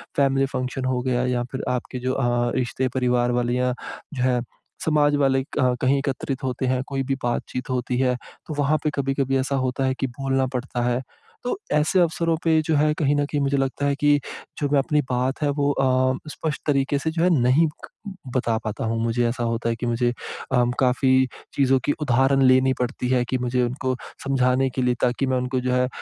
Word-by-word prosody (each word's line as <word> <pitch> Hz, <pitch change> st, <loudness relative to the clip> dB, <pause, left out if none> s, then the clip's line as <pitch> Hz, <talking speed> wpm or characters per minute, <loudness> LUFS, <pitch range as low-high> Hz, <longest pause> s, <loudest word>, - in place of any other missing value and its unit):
Family 135 Hz, -1 st, +3 dB
function 130 Hz, +1 st, -2 dB
हो 130 Hz, -1 st, 0 dB
गया 125 Hz, -1 st, 0 dB
या 125 Hz, -1 st, 0 dB
फिर 130 Hz, -, -4 dB
आपके 125 Hz, 0 st, -3 dB
जो 130 Hz, +1 st, -1 dB
अ, 120 Hz, -2 st, +1 dB
रिश्ते 130 Hz, +1 st, -1 dB
परिवार 125 Hz, -1 st, +2 dB
वाले 120 Hz, 0 st, 0 dB
या 125 Hz, 0 st, +1 dB, 0.4 s
जो 125 Hz, -3 st, -2 dB
है 125 Hz, -1 st, +2 dB, 0.4 s
समाज 145 Hz, -2 st, +3 dB
वाले 135 Hz, -2 st, +2 dB
क 125 Hz, -2 st, +3 dB
कहीं 135 Hz, +2 st, +3 dB
एकत्रित 135 Hz, 0 st, -3 dB
होते 130 Hz, 0 st, -2 dB
हैं, 130 Hz, 0 st, +1 dB
कोई 135 Hz, -1 st, -2 dB
भी 135 Hz, +1 st, -1 dB
बातचीत 125 Hz, +1 st, -3 dB
होती 125 Hz, -1 st, -1 dB
है 125 Hz, -1 st, +2 dB, 0.3 s
तो 155 Hz, -, -4 dB
वहाँ 145 Hz, +2 st, +3 dB
पे 150 Hz, -, +2 dB
कभी-कभी 135 Hz, -1 st, 0 dB
ऐसा 135 Hz, +1 st, -1 dB
होता 130 Hz, 0 st, 0 dB
है 130 Hz, -, +1 dB
कि 135 Hz, -, 0 dB
बोलना 135 Hz, -1 st, +1 dB
पड़ता 125 Hz, -1 st, -3 dB
है। 125 Hz, +1 st, 0 dB, 0.4 s
तो 245 Hz, -, -1 dB, 0.2 s
ऐसे 150 Hz, +5 st, +3 dB
अवसरों 165 Hz, -1 st, +2 dB
पे 160 Hz, -1 st, +3 dB
जो 160 Hz, 0 st, +1 dB
है 150 Hz, +1 st, +3 dB
कहीं 145 Hz, -1 st, +2 dB
न 145 Hz, -, +1 dB
कहीं 145 Hz, 0 st, -2 dB
मुझे 140 Hz, 0 st, +1 dB
लगता 135 Hz, +1 st, -1 dB
है 140 Hz, 0 st, +2 dB
कि, 145 Hz, 0 st, +4 dB, 0.4 s
जो 145 Hz, -, 0 dB
मैं 145 Hz, 0 st, +3 dB
अपनी 150 Hz, +2 st, +1 dB
बात 130 Hz, +3 st, -1 dB
है 145 Hz, -, +2 dB
वो 145 Hz, 0 st, +1 dB
अ, 130 Hz, -1 st, +2 dB
स्पष्ट 155 Hz, -3 st, -4 dB
तरीके 140 Hz, 0 st, +2 dB
से 160 Hz, +2 st, -2 dB
जो 165 Hz, +1 st, 0 dB
है 180 Hz, -, +4 dB
नहीं 130 Hz, +7 st, +4 dB, 0.7 s
बता 120 Hz, -3 st, +1 dB
पाता 110 Hz, +1 st, -3 dB
हूँ। 115 Hz, 0 st, -1 dB
मुझे 115 Hz, +1 st, +1 dB
ऐसा 120 Hz, 0 st, -3 dB
होता 115 Hz, 0 st, -1 dB
है 115 Hz, -, 0 dB
कि 115 Hz, -, -5 dB
मुझे 120 Hz, +1 st, +1 dB, 0.4 s
अम 120 Hz, 0 st, +3 dB
काफ़ी 130 Hz, 0 st, +3 dB, 0.3 s
चीज़ों 135 Hz, -1 st, +3 dB
की -, -, +2 dB
उदाहरण 135 Hz, 0 st, +3 dB
लेनी 130 Hz, 0 st, +5 dB
पड़ती 125 Hz, 0 st, -2 dB
हैं 125 Hz, -1 st, +3 dB
कि 130 Hz, -, +1 dB
मुझे 125 Hz, 0 st, 0 dB
उनको 130 Hz, +1 st, -1 dB, 0.3 s
समझाने 130 Hz, -1 st, +2 dB
के 130 Hz, -, 0 dB
लिए 125 Hz, -1 st, +2 dB
ताकि 125 Hz, +2 st, +1 dB
मैं 130 Hz, -1 st, +1 dB
उनको 125 Hz, +1 st, -1 dB
जो 125 Hz, 0 st, 0 dB
है 125 Hz, 0 st, +2 dB
130 Hz, 210 wpm, -23 LUFS, 125-140 Hz, 0.7 s, लेनी